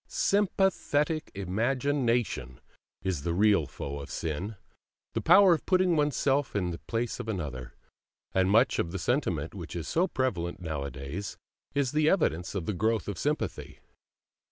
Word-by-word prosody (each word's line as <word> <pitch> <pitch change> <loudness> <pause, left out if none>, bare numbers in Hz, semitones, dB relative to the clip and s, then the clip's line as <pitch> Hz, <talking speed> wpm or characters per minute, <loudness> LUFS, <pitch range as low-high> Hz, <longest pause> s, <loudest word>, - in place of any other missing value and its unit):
SYMPATHETIC 185 -6 +1
IMAGINATION 115 - 0 0.4
is 95 -6 -1
the 85 +3 -1
real 100 -6 +4
foe 70 +1 -6
of 70 0 -8
sin, 85 +9 -3 0.6
the - - -1
power 195 -3 +7
of 160 - -3
putting 185 -2 +3
oneself 145 -3 +1
in 90 -3 0
the 85 - -6
place 115 +1 -2
of 120 - -5
another; 70 - -4 0.6
and 95 0 +3
much 115 +6 +4
of 85 - -1
the 95 - -3
sentiment 90 - -1
which 85 -4 -7
is 85 -2 -4
so 175 +3 +2
prevalent 95 - -2
nowadays 75 +2 -5 0.4
is 140 -3 +1
the 155 0 +3
evidence 95 - +1
of 90 -4 -2
the 105 - -1
growth 110 +3 0
of 100 -4 -4
sympathy. 150 +1 -2
105 Hz, 150 wpm, -29 LUFS, -, 0.6 s, power